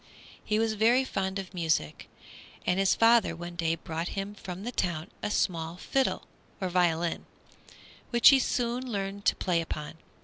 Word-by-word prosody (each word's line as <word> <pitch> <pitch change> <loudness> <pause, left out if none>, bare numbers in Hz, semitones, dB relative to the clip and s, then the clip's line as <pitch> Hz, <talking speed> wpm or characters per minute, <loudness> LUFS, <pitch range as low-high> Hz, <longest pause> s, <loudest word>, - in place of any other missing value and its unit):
He 215 - 0
was 225 0 +1
very 230 +5 +4
fond 190 -6 -2
of 190 -1 -7
music, 160 - -1 0.6
and 180 +1 +1
his 195 -1 +3
father 225 -6 +4
one 175 +1 -8
day 165 -1 0
brought 165 +1 -5
him 195 +1 -3
from 190 -2 -8
the 240 - -3
town 170 -8 -2
a 210 - -2
small 170 -4 -1
fiddle, 265 +8 0 0.4
or 190 -3 -2
violin, 175 -2 0 0.8
which 240 -1 +7
he 275 - +6
soon 245 0 -1
learned 200 -1 -4
to - - +4
play 175 -3 0
upon. 160 0 -6
190 Hz, 165 wpm, -28 LUFS, 170-220 Hz, 0.8 s, which